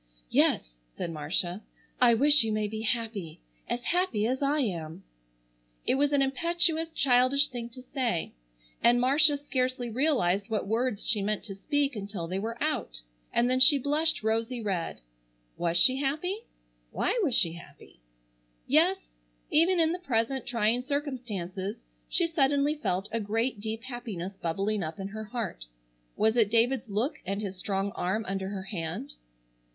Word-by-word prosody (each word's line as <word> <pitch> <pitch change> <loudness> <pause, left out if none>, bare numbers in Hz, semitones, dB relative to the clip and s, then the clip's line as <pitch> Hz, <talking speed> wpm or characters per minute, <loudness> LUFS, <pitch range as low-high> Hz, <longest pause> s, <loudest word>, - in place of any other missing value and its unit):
"Yes," - - +2 0.2
said 170 - -3
Marcia, 175 +5 -2 0.4
"I 240 -2 +6
wish 290 +3 +6
you 220 - -1
may 215 0 0
be 220 +1 -5
happy,—as 210 - -4
happy 350 - +1
as 255 +4 -1
I 285 +2 +2
am!" 170 - -4 0.8
It - - +3
was 285 +2 +2
an 280 -1 +3
impetuous, 325 +4 +1
childish 275 -1 +3
thing 240 -2 -6
to 250 +2 -12
say, 250 - -2 0.5
and 240 +1 +5
Marcia 285 +4 +5
scarcely 255 -4 -2
realized 230 - +1
what 220 -2 -1
words 225 +1 -1
she 215 -3 +2
meant 210 +1 -1
to 200 - -7
speak 285 +5 0
until 200 -4 -5
they 185 +3 -3
were 230 +3 -4
out, - - -2 0.3
and 240 +1 +2
then 255 +1 +2
she 280 +3 +8
blushed 295 +1 0
rosy 225 +3 0
red. 190 - -3 0.5
Was 170 0 0
she 255 +9 +6
happy? 310 +10 -2 0.4
Why 460 - 0
was 275 -9 +1
she 170 -4 +3
happy? 170 - -14 0.7
Yes, - - +4 0.5
even 340 +3 +4
in 325 -1 +3
the 355 - -3
present 260 -4 -1
trying 230 0 +1
circumstances 235 - -4 0.3
she 345 - +2
suddenly 285 -2 +2
felt 195 -10 -2
a 230 - -1
great 225 +2 -1
deep 220 +1 -4
happiness 220 -7 -6
bubbling 195 +4 -1
up 160 +3 -5
in 195 0 -4
her 215 +1 -6
heart. 215 - -5 0.5
Was 220 +1 +2
it 220 -4 +4
David's 230 +1 +2
look 220 +9 -1
and 195 +2 -3
his 200 -3 -4
strong 195 +1 -2
arm 210 +5 -2
under 190 0 -3
her 195 -2 -5
hand? 165 - -5
230 Hz, 155 wpm, -28 LUFS, 195-275 Hz, 0.8 s, she